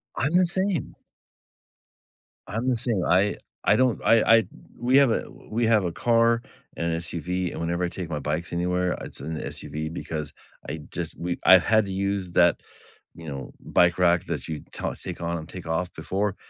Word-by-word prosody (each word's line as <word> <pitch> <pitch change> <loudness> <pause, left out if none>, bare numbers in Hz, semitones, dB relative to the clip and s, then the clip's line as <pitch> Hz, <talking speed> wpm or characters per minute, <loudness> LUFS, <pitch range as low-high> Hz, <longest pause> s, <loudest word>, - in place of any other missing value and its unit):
I'm 135 +8 0
the 180 +1 +5
same. 185 -2 0 1.5
I'm 115 +5 -3
the 130 - +3
same, 115 -5 0
I 95 +3 +3 0.3
I - - +4
don't 130 -2 +2
I 115 -1 +6
I 115 0 +6
d - - -11 0.3
we 125 +2 +3
have 140 -4 +6
a - - -1 0.2
we 115 +2 0
have 110 -3 +4
a 90 - -1
car 115 +4 +3 0.4
and 85 0 -1
SUV, 90 +2 -2
and - - -6
whenever 85 +2 -1
I - - +2
take 90 -1 -6
my 75 -2 -2
bikes 75 +5 -3
anywhere, 90 +1 0
it's - - -8
an 80 +4 -5
SUV, 75 +1 -5
because 75 -3 -5 0.3
I - - -4
just - - -4
we 85 +1 -2
I 95 - +10
had 110 +4 +3
to 100 - -5
use 95 -1 -2
that, 85 -2 +4 0.6
you 85 -1 -10
know, 70 -2 -6
bike 85 -1 +3
rack 90 -1 +3
that - - -4
you 80 -2 -5
ta - - -3
take - - -8
on 85 0 -2
and 80 0 -8
take 90 -3 -8
off 85 +2 -1
before, 100 +1 -2
90 Hz, 195 wpm, -25 LUFS, 85-115 Hz, 1.5 s, I